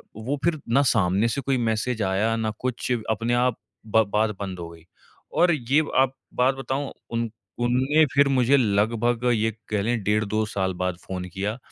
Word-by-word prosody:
वो 115 +7 -3
फिर 170 -2 +1
ना 130 +4 +4
सामने 95 +5 +2
से 115 +4 -2
कोई 135 0 0
मैसेज़ 115 0 -1
आया 100 +4 +1
ना 110 -1 -1
कुछ 130 0 -3 0.2
अपने 115 +2 -1
आप 125 0 +2 0.3
ब 110 +1 +4
बात 110 +1 +3
बंद 95 -3 -5
हो 85 -1 -6
गई। 85 -1 -15 0.5
और 175 0 +4
ये 140 +1 +2 0.2
आप 135 0 +1 0.2
बात 130 +2 +3
बताऊँ 135 +1 -3 0.2
उन 115 0 -1 0.3
उन 120 0 +1
ने 150 +4 +4
फिर 140 0 +5
मुझे 130 +1 +4
लगभग 115 +1 +1
ये 110 0 +1 0.2
कह 105 -2 0
ले 120 +3 +1
डेढ़ 105 +1 0
2 110 +2 0
साल 95 -3 -2
बाद 90 0 -2
फ़ोन 90 -1 -5
किया। 100 +4 -2
115 Hz, 190 wpm, -24 LUFS, 105-130 Hz, 0.5 s, फिर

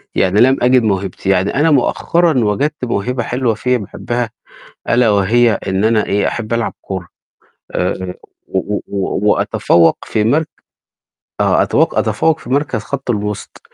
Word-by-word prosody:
يعني 95 +4 +2
لم 130 +2 +5
أجد 125 -1 +4
موهبتي، 95 -2 -2
يعني 95 +4 +1
أنا 150 +3 +3
مؤخّرًا 155 +2 +2
وجدت 140 +7 -1
موهبة 120 +2 -2
حلوة 125 -2 0
فيّا 125 +3 0
باحبّها 120 +3 -4 0.6
ألا 120 -2 +3
وهي 110 +4 +3 0.2
إن 95 +2 0
أنا 110 -2 +2
إيه، 100 0 +1
أحب 115 -1 -4
ألعب 115 -1 -1
كورة 95 -3 -6 0.6
آآ، 90 0 -2 0.3
و 100 +2 -2 0.5
وأتفوّق 85 -1 +2
في 105 - 0
مرك 150 +8 +1 0.9
آه - - +3
أتو - - +2
أتفوّق 160 -1 0
في 125 - -11
مركز 140 -5 0
خَط 135 -1 -4
الوِسط، 105 -2 -4
115 Hz, 140 wpm, -16 LUFS, 100-125 Hz, 0.9 s, لم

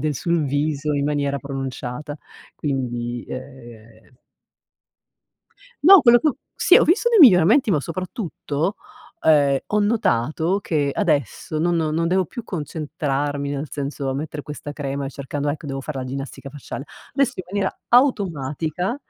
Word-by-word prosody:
del 150 0 -1
sul 170 +4 0
viso 145 +1 -1
in 140 0 0
maniera 140 -1 0
pronunciata. 135 +1 -5 0.4
Quindi, 120 -4 -3
uhm 120 -3 -11 1.7
No, 380 +4 +9
quello 240 -1 +7
che 310 - +2
ho 275 - -2 0.2
sì, 365 - +5
ho - - +5
visto 385 +9 +3
dei 460 -3 +4
miglioramenti, 220 - +7
ma 150 -5 +2
soprattutto, 175 - -3 0.5
ehm, 145 -3 +4
ho 210 - +1
notato 185 - +1
che 145 -6 0
adesso 155 - -1
non 175 +2 +1
non 160 +1 0
devo 185 0 +1
più 240 - -8
concentrarmi, 145 -3 -3
nel 145 +1 -3
senso 140 -1 -3
a - - -2
mettere 145 +1 -5
questa 145 0 -7
crema 140 -1 -4
e - - -5
cercando: 145 +2 -4
“Ecco, 150 +2 -3
devo 135 -1 -4
fare 135 0 -5
la 130 - -4
ginnastica 135 +1 -6
facciale”. 140 0 -7 0.3
Adesso, 270 -2 +2
in 185 - -5
maniera 200 -1 -2
automatica, 180 - +1
150 Hz, 150 wpm, -22 LUFS, 140-180 Hz, 1.7 s, No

